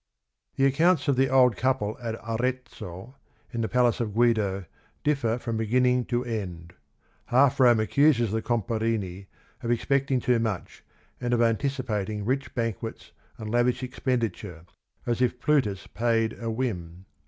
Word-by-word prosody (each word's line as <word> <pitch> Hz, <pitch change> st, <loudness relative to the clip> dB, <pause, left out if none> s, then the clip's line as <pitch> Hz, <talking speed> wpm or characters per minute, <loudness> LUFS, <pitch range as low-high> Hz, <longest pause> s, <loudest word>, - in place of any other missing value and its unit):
The 135 Hz, -, +3 dB
accounts 155 Hz, +3 st, +3 dB
of 140 Hz, -, +3 dB
the 135 Hz, +1 st, +2 dB
old 125 Hz, -3 st, +5 dB
couple 130 Hz, -5 st, 0 dB
at 115 Hz, -2 st, -3 dB
Arezzo, 120 Hz, -2 st, -4 dB, 0.4 s
in 120 Hz, -, -2 dB
the 110 Hz, -, -1 dB
palace 125 Hz, -2 st, +2 dB
of 110 Hz, -4 st, -3 dB
Guido, 110 Hz, -5 st, +2 dB, 0.4 s
differ 135 Hz, -6 st, +1 dB
from 115 Hz, -2 st, -3 dB
beginning 125 Hz, +2 st, +2 dB
to 120 Hz, 0 st, -1 dB
end. 90 Hz, -8 st, -5 dB, 0.5 s
Half 130 Hz, +2 st, +3 dB
Rome 120 Hz, -3 st, +6 dB
accuses 120 Hz, -1 st, +3 dB
the 110 Hz, +1 st, -1 dB
Comparini 110 Hz, -5 st, -2 dB, 0.3 s
of 120 Hz, -, -4 dB
ex 120 Hz, -1 st, 0 dB
pecting 135 Hz, -2 st, +2 dB
too 125 Hz, -1 st, +2 dB
much 110 Hz, -5 st, -4 dB, 0.4 s
and 120 Hz, -1 st, 0 dB
of 120 Hz, -, +1 dB
anticipating 110 Hz, -4 st, -1 dB
rich 135 Hz, +4 st, -2 dB
ban 115 Hz, -3 st, 0 dB
quets 110 Hz, +4 st, -8 dB, 0.3 s
and 110 Hz, -1 st, -6 dB
lavish 125 Hz, +2 st, +1 dB
expenditure, 110 Hz, -, -3 dB, 0.4 s
as 120 Hz, 0 st, -1 dB
if 125 Hz, 0 st, +1 dB
"Plutus 115 Hz, -10 st, +1 dB
paid 115 Hz, -1 st, 0 dB
a 115 Hz, -, -2 dB
whim." 95 Hz, -7 st, -4 dB
120 Hz, 150 wpm, -26 LUFS, 110-130 Hz, 0.5 s, Rome